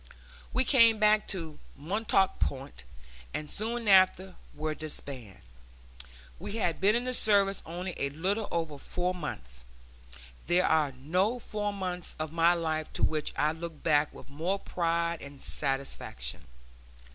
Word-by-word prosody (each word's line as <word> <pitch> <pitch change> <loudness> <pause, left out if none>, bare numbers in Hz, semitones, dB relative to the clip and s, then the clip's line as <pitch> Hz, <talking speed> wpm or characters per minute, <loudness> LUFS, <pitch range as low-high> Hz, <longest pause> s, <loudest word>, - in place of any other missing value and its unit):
We 260 - +2
came 230 -4 +6
back 215 0 +4
to 165 -6 -3 0.2
Montauk 195 +4 +1
Point 135 - -3 0.5
and 150 -1 -4
soon 230 +2 -1
after 190 -1 +5 0.2
were 155 +1 -2
disbanded. 140 - -5 1.0
We - - -6
had 180 -8 -1
been 205 +3 +5
in 240 - +1
the 255 0 -1
service 200 -4 +3
only 175 +2 -4
a 140 - -1
little 190 +9 -1
over 165 -4 -2
four 180 +5 -2
months. 60 - -6 0.8
There 175 +2 +4
are 155 -3 +3
no 180 - 0
four 210 -3 -3
months 185 -3 -4
of 155 -1 -3
my 170 +1 +4
life 155 -2 -2
to - - -3
which 155 -1 +1
I 150 +1 +3
look 160 -1 -7
back 150 -2 +3
with - - -13
more 165 +8 -1
pride 170 -2 -1
and 140 0 -10
satisfaction. 135 - -2
170 Hz, 145 wpm, -30 LUFS, 150-200 Hz, 1.0 s, came